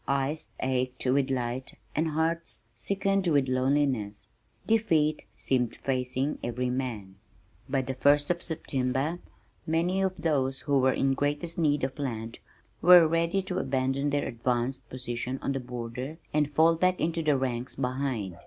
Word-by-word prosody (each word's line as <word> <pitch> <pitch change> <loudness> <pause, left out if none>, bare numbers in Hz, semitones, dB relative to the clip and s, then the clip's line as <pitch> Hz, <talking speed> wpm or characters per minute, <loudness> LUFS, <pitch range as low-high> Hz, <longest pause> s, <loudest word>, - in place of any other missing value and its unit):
Eyes 140 +3 -1
ached 130 0 -1
with 135 +1 +2
light 125 0 -3 0.2
and 160 +2 +1
hearts 160 +2 -1
sickened 195 -1 0
with 145 -5 +3
loneliness. 130 -6 0 0.4
Defeat 165 -9 +2
seemed 125 -3 0
facing 130 +2 -2
every 125 +1 -1
man. 115 -7 -4 0.5
By 135 -1 +1
the 130 - -3
first 145 +4 +3
of 175 0 -2
September 140 0 -1 0.5
many 170 +4 +1
of 190 -1 0
those 135 -4 0
who 140 -1 +2
were 130 0 +4
in 135 0 +2
greatest 145 +5 -2
need 145 -4 +2
of 130 +2 -2
land 115 -5 -4 0.4
were 175 -2 +9
ready 170 +4 +1
to 185 0 -2
abandon 135 +1 0
their 145 0 0
advanced 120 +1 -2
position 125 0 -4
on - - 0
the 135 - -1
border 125 +4 -6 0.2
and 150 -1 +2
fall 160 +3 +5
back 185 +1 +2
into 165 +1 0
the 150 -3 +2
ranks 125 -1 -2
behind. 125 -8 -2
135 Hz, 150 wpm, -28 LUFS, 125-160 Hz, 0.5 s, were